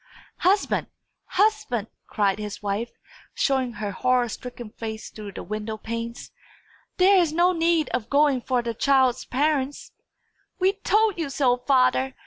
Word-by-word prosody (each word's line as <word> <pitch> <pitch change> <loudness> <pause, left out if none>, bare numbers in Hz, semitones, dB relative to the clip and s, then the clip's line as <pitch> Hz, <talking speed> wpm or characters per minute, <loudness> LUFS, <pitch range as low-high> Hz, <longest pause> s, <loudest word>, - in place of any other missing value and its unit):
"Husband! 390 +3 +2 0.4
husband!" 375 - +1 0.2
cried 205 -2 0
his 210 -1 -6
wife, 205 +4 -2 0.5
showing 260 -3 +1
her 210 -3 -4
horror 250 +3 +1
stricken 240 -2 -8
face 220 -1 -7
through 210 -2 -9
the - - -7
window 215 +1 -4
panes. 230 +1 -6 0.7
"There 380 +1 +6
is 340 -4 +2
no 345 +3 +3
need 330 -3 +2
of 240 -2 -3
going 285 -2 +3
for 250 -1 0
the 235 -1 -2
child's 260 +1 +2
parents!" 285 0 -1 0.7
"We 380 +1 +2
told 410 -1 +1
you 320 -4 -2
so, 265 -3 +2
father!" 255 +1 +2
255 Hz, 140 wpm, -24 LUFS, 230-320 Hz, 0.7 s, There